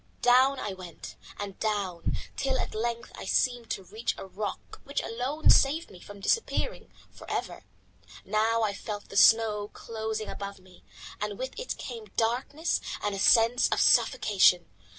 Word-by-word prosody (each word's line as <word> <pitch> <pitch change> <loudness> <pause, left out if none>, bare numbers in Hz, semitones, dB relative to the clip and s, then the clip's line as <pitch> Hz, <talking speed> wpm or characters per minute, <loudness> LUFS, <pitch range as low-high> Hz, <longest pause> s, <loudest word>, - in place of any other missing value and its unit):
Down 260 +2 +5
I 205 - -3
went, 180 -4 -10 0.2
and 200 -2 -6
down, 200 -5 -1 0.2
till 265 -1 0
at - - -3
length 235 +1 -3
I - - -8
seemed 245 -3 +1
to 195 - -3
reach 215 +5 -3
a - - -7
rock 195 +1 -6
which 280 - -2
alone 255 +7 +1
saved 305 +5 +3
me 185 - -13
from 205 +2 -12
disappearing 460 - -1 0.2
for - - -13
ever. - - -4 0.6
Now 220 +3 +1
I 210 -2 0
felt 205 0 -7
the - - -10
snow 215 -1 +5
closing 220 -1 -4
above 200 0 -6
me 185 -1 -19 0.4
and 210 -1 -3
with 260 +1 -4
it - - -4
came 230 -3 -7
darkness 255 +8 0 0.2
and 205 - 0
a 195 - -4
sense 230 +4 +5
of - - +1
suffocation. 185 -4 +4
220 Hz, 160 wpm, -28 LUFS, 200-245 Hz, 0.6 s, Down